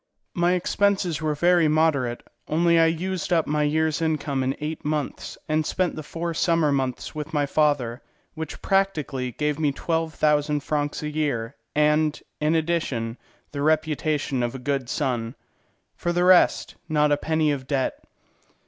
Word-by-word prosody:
My 175 +1 +2
expenses 185 -2 +1
were 155 -1 0
very 175 +1 +4
moderate; 150 -6 +1 0.2
only 170 +1 +3
I 165 - +5
used 180 +2 -2
up 165 -3 +3
my 150 0 0
year's 155 +1 +1
income 150 -4 0
in 130 +1 0
eight 155 +1 -4
months, 150 -2 -3
and 155 0 +1
spent 180 +3 -1
the 155 - -5
four 165 +3 -4
summer 165 -3 +2
months 130 -3 -2
with 155 0 -5
my 145 -1 +2
father, 140 -5 +1 0.3
which 160 -2 -7
practically 155 -10 0
gave 150 +2 -1
me 150 -2 +2
twelve 160 +2 -2
thousand 150 -1 +2
francs 145 +1 -2
a 150 - -2
year, 140 -6 -2 0.2
and, 150 0 +2 0.2
in 150 +2 +2
addition, 150 -8 -1 0.3
the 140 -1 -4
reputation 155 -3 0
of 120 +1 -2
a 125 -1 -9
good 135 -3 -1
son. 125 -4 -2 0.6
For 175 - -2
the 175 +1 +1
rest, 180 0 +4 0.2
not 150 -1 +3
a - - +5
penny 155 0 +1
of 135 -2 -4
debt. 135 -2 -1
150 Hz, 160 wpm, -24 LUFS, 140-165 Hz, 0.6 s, I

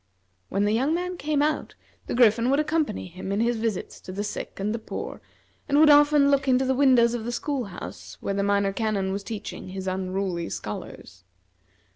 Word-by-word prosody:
When 200 - 0
the 210 - +2
young 270 +8 +2
man 360 +1 -3
came 295 -3 0
out, 305 0 -1 0.3
the - - -2
Griffin 235 0 +4
would 275 +2 +3
accompany 305 -6 0
him 185 +2 -7
in 200 - 0
his 235 +1 +1
visits 220 -4 -3
to - - -8
the 200 +2 -3
sick 205 - -6
and 205 +2 -1
the 230 - -3
poor, - - -6 0.5
and 285 - +3
would 305 -1 +8
often 290 -1 +6
look 275 -1 +2
into 260 0 +3
the 265 - +2
windows 255 -3 +4
of 240 -2 -3
the 240 - -3
school 265 +1 -2
house 190 -3 -9
where 200 - -2
the 200 - 0
Minor 200 0 +1
Canon 200 -3 -1
was 200 +1 -3
teaching 215 -2 -6
his 190 0 -6
unruly 185 -2 -2
scholars. 95 +1 -7
225 Hz, 200 wpm, -25 LUFS, 195-280 Hz, 0.5 s, would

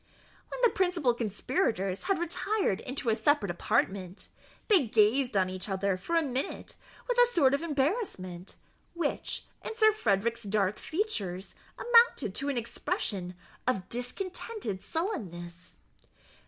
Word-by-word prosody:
When - - -6
the 480 - +6
principal 355 -9 +2
conspirators 210 - -1
had 390 0 +2
retired 345 - 0
into 255 -2 -2
a - - +2
separate 220 - +2
apartment, 185 +2 -1 0.4
they 370 - +4
gazed 225 +2 +3
on 185 -1 +3
each 185 +2 -5
other 195 0 +1
for 260 - -3
a 330 - +4
minute 265 -1 -4 0.3
with - - +1
a 485 - +8
sort 280 - +4
of 280 - +1
embarrassment, 275 - -2 0.4
which, 335 -4 -2 0.2
in 445 - -5
Sir 435 -2 +6
Frederick's 230 - 0
dark 205 -2 0
features, 205 - -2 0.2
amounted 470 - +4
to 275 +6 -3
an 275 - -1
expression 195 -5 -3 0.3
of 195 -8 0
discontented 250 - -3
sullenness. 180 - -4
245 Hz, 130 wpm, -30 LUFS, -, 0.4 s, a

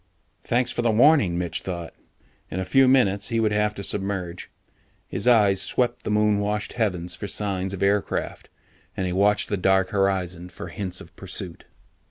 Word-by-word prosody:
Thanks 120 +1 +1
for - - -2
the 120 - +1
warning, 115 - +4
Mitch 85 -1 -2
thought. 85 -3 -6 0.6
In 95 - -4
a 95 - -2
few 135 +4 +4
minutes, 100 -6 +3
he 115 -1 0
would 110 -1 +2
have 105 0 0
to 100 - -6
submerge. 95 -3 -3 0.6
His 110 - -2
eyes 105 -5 +5
swept 125 -1 -1
the - - -2
moon 105 -1 +2
washed 105 +1 -2
heavens 90 -7 -1
for 100 - -6
signs 95 -2 -2
of 100 -1 -3
aircraft, 100 +1 -1 0.5
and 95 - -1
he 90 - -2
watched 100 +2 +2
the 100 - 0
dark 95 0 +2
horizon 95 -3 -1
for - - -9
hints 95 -3 -5
of 85 - -14
pursuit. 95 -2 -6
100 Hz, 180 wpm, -24 LUFS, 90-105 Hz, 0.6 s, eyes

